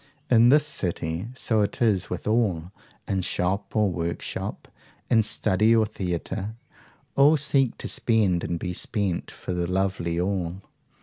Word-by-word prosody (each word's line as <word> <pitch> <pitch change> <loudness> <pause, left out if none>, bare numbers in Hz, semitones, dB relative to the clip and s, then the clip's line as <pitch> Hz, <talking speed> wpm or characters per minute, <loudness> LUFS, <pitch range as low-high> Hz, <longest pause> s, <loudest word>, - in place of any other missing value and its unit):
In 120 0 +6
this 150 +2 +5
city 90 - -3
so 110 -4 +1
is 105 -1 +1
it - - -17
with 90 - -5
all 100 -7 0 0.4
in 95 -1 0
shop 95 +4 -2
or 105 -3 +3
workshop, 85 -1 -4 0.4
in 115 -2 +6
study 110 +1 +3
or 110 -1 +4
theatre, 95 +1 -4 0.6
all 145 +3 +6
seek 135 -4 +2
to - - -6
spend 100 -7 +1
and 85 - -2
be 90 +1 -4
spent 100 -1 -2
for - - -6
the 90 -1 -1
lovely 90 -3 0
all. 90 0 -2
100 Hz, 145 wpm, -25 LUFS, 90-110 Hz, 0.6 s, In